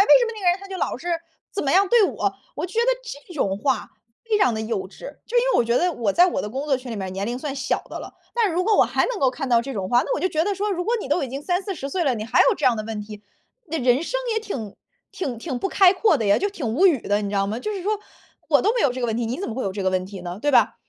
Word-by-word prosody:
为 405 - -1
什 - - +3
么 460 - -3
那 430 - -8
个 360 -2 +4
人 350 - 0
他 395 - -10
就 380 -1 -6
老 - - -1
是 335 +8 -7 0.4
怎 400 - -2
么 275 - 0
样 390 +2 +5
对 475 +1 +5
我。” 395 - 0 0.2
我 - - -2
就 365 - -6
觉 455 - -2
得 470 - +2 0.4
这 355 - -10
种 195 -9 0
话 255 0 -1 0.3
非 440 -2 +1
常 250 - +3
地 220 - -3
幼 215 -4 -3
稚， - - -17 0.3
就 - - -2
因 480 - +5
为 - - 0
我 - - +5
觉 235 +1 +1
得 355 +4 +2
我 230 -9 0
在 350 - +5
我 370 - -1
的 210 - -4
工 265 +6 -4
作 285 -3 +2
群 255 -1 -9
里 225 - -4
面， 190 -2 -4
年 195 +2 -3
龄 240 +2 -3
算 280 0 -4
小 270 - -1
的 - - -5
了， - - -9 0.2
但 470 -2 +3
是 - - -3
如 365 +2 +1
果 435 +1 +3
我 - - +7
还 - - +1
能 - - -3
够 265 -6 +3
看 270 +2 -5
到 235 -1 +5
这 270 +3 -6
种 195 -3 -2
话， 245 - +5
那 - - -1
我 - - -3
就 - - +2
觉 315 - +1
得 400 +4 0
说， 410 +2 -1
如 355 -2 -1
果 455 +6 0
你 415 - -5
都 300 +5 +1
已 270 - -2
经 275 +3 -6
30-40 355 -4 -2
岁 370 +2 0
了， 270 -4 +2
你 215 -2 -4
还 225 - +2
有 - - +5
这 - - -4
样 250 - +5
的 215 - -3
问 215 -1 -4
题， 210 0 -10 0.4
那 325 0 -3
人 250 +1 +3
生 - - -2
也 445 - 0
挺 245 - -6 0.4
挺 265 -10 -3
挺 250 +2 -4
不 390 - -1
开 380 -2 +6
阔 395 -3 +3
的 230 - -2
呀， 200 0 +4
就 405 - 0
挺 370 -10 -5
无 260 - +3
语 305 - +3
的， 205 +1 +1
你 205 - -3
知 200 - -2
道 195 0 +2
吗？ 215 +3 -3
就 425 +12 -3
是 390 -3 -5
说， 420 +2 0 0.5
我 - - +4
都 430 - +3
没 - - +1
有 270 - +3
这 255 - -5
个 240 - 0
问 225 - -1
题， 235 -1 -1
你 245 +5 -3
怎 395 - -3
么 - - -4
会 260 - -3
有 195 - -2
这 195 0 -4
个 190 - +2
问 185 0 0
题 195 -1 -9
呢， 175 +1 -6
对 290 - +1
吧？ 270 - +4
275 Hz, 365 characters per minute, -23 LUFS, -, 0.5 s, 我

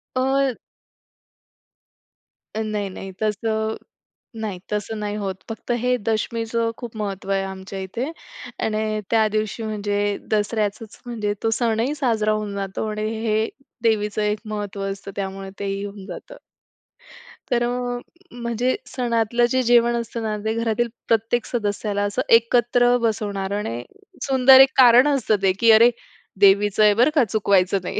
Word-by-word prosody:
अ 265 -1 +1 2.0
नाही, 215 -2 -2
नाही. 190 +1 -8
तसं 220 +1 -1 0.7
नाही, 205 -5 -4
तसं 210 +1 -3
नाही 210 0 -3
होत 195 -2 -3
फक्त 225 +2 -8
हे 250 0 +2
दशमीचं 230 +1 -1
खूप 235 -2 -8
महत्त्व 195 -2 -4
आहे 195 0 +1
आमच्या 190 0 -7
इथे 235 - -4 0.5
आणि 215 0 -1
त्या 220 -1 +4
दिवशी 215 +1 -2
म्हणजे 205 -1 -1
दसऱ्याचंच 215 +1 -1
म्हणजे 215 -4 -2
तो 225 - +1
सणही 235 +4 0
साजरा 225 -7 +1
होऊन 210 -1 -3
जातो 195 +2 -3
आणि 215 0 -2 0.2
हे 220 +1 +1 0.3
देवीचं 210 -2 +1
एक 210 0 0
महत्त्व 205 -2 -5
असतं 195 0 -7
त्यामुळे 195 0 -5
तेही 200 0 -3
होऊन 200 -1 -8
जातं. - - -9 1.2
तर 240 0 +2
अ, 245 0 -2 0.4
म्हणजे 235 +2 0
सणातलं 240 -2 +1
जे 260 0 +2
जेवण 240 0 +4
असतं 235 0 -4
ना, 215 -1 -2
ते 220 - +1
घरातील 230 +1 0 0.2
प्रत्येक 225 +1 +1
सदस्याला 205 -2 -2
असं 205 +5 -1 0.2
एकत्र 245 +1 +2
बसवणार 205 -3 -1
आणि 120 - -4 0.4
सुंदर 265 -1 +7
एक 270 - +7
कारण 250 +2 +7
असतं 260 -7 +2
ते 190 -1 +4
की 230 -1 +6
अरे 230 +2 +7 0.5
देवीचं 205 +1 +5
आहे 210 -1 +6
बरं 245 +7 +4
का 280 - +5
चुकवायचं 200 -2 +2
नाही - - -3
220 Hz, 140 wpm, -22 LUFS, 205-235 Hz, 2.0 s, सुंदर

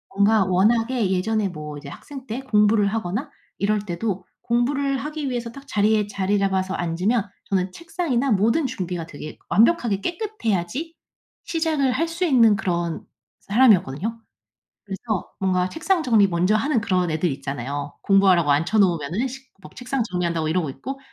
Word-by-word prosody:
뭔가 205 0 +4
워낙에 225 +3 +2
예전에 205 +2 0
뭐 150 -3 -7
이제 145 -1 -9
학생 270 - -10
때 240 0 -4
공부를 210 -4 +3
하거나 220 - -2 0.3
이럴 210 +1 +1
때도 185 0 -3 0.2
공부를 275 +4 +1
하기 300 +1 -4
위해서 240 -2 -3
딱 275 +3 -13
자리에 210 -1 +2
자리 200 0 0
잡아서 190 -1 0
앉으면 190 +6 0 0.2
저는 185 -1 -1
책상이나 295 -7 -1
모든 225 +9 +2
준비가 180 -8 -4
되게 155 -1 -9
완벽하게 230 - +3
깨끗해야지 330 - -3 0.5
시작을 315 -5 0
할 330 +6 0
수 335 +2 -3
있는 235 -9 +5
그런 170 -5 -2 0.4
사람이었거든요. 210 - +2 0.7
그래서 200 0 -4
뭔가 185 -1 +1
책상 335 - 0
정리 220 -6 +4
먼저 180 +4 +1
하는 265 -1 +1
그런 180 -5 +1
애들 160 0 0
있잖아요. 140 +1 -5
공부하라고 190 -6 +4
앉혀놓으면은 175 - +1
식 265 +1 -11
막 - - -13
책상 250 +1 -2
정리한다고 170 -5 -1
이러고 165 -3 0
있고, 270 - -7
210 Hz, 365 characters per minute, -23 LUFS, 180-255 Hz, 0.7 s, 있는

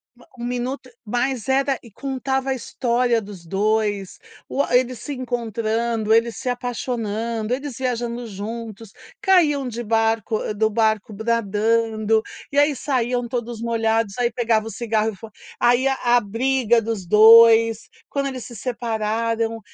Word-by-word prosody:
Ma 245 - -20
1 240 - -7
minuto 250 +2 -4
mas 245 +1 -2
era 270 0 +1
e 235 - -14
contava 265 +2 -2
a - - +2
história 245 -2 0
dos 195 -4 -11
2. 205 0 -1 0.3
U 280 - 0
a 265 - 0
eles 250 -2 -1
se 290 - -6
encontrando, 230 -3 -1
eles 230 0 +2
se 250 - -3
apaixonando, 230 -2 -3
eles 275 -1 -4
viajando 240 -2 -3
juntos, 220 +1 -7 0.3
caíam 300 -8 +3
de 240 0 -5
baroc 225 -1 +1 0.3
do 220 +1 +2
barco 220 -1 0
nadando, 220 0 +1 0.3
e 285 - +2
aí 290 0 +3
saíam 250 -3 -1
todos 235 -1 -4
molhados, 225 -2 0
aí 240 -1 +1
pegava 225 -2 0
o - - -4
cigarro, 220 -2 -1
e - - -12
fo 225 +4 -11 0.3
e - - +2
aí 245 +2 +4
a 245 -2 +3
briga 235 +2 +1
dos 215 -5 -4
2. 225 +2 +7 0.2
Quando 280 -1 -2
eles 260 -3 -5
se 240 - -10
separaram, 230 -1 -2
230 Hz, 150 wpm, -22 LUFS, 220-250 Hz, 0.3 s, 2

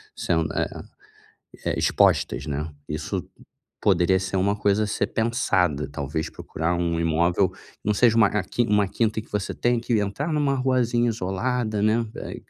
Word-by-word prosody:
sendo, 80 -2 0
eh - - 0 1.0
eh, - - +1
expostas, 60 +5 +2
né. 75 +1 -3 0.2
Isso 75 0 -3 0.6
poderia 95 -1 +3
ser 95 0 -3
uma 100 +2 +1
coisa 105 +1 +2
a - - -2
ser 105 - -1
pensada, 95 - +1
talvez, 75 +2 -3
procurar 85 +2 -3
um 85 -1 0
imóvel, 85 +3 +2 0.3
não 105 - +2
seja, 115 +1 +4
eh, - - +4
uma 110 -3 +5 0.4
uma 105 -2 +3
quinta 110 +1 0
que - - -22
você 105 -2 -2
tenha 120 0 +1
que 120 -1 0
entrar 120 +11 -2
numa 145 -2 +1
ruazinha 125 -2 +1
isolada, 110 +1 -1
né, 110 +2 +2
eh, - - -6
100 Hz, 160 wpm, -24 LUFS, 85-115 Hz, 1.0 s, uma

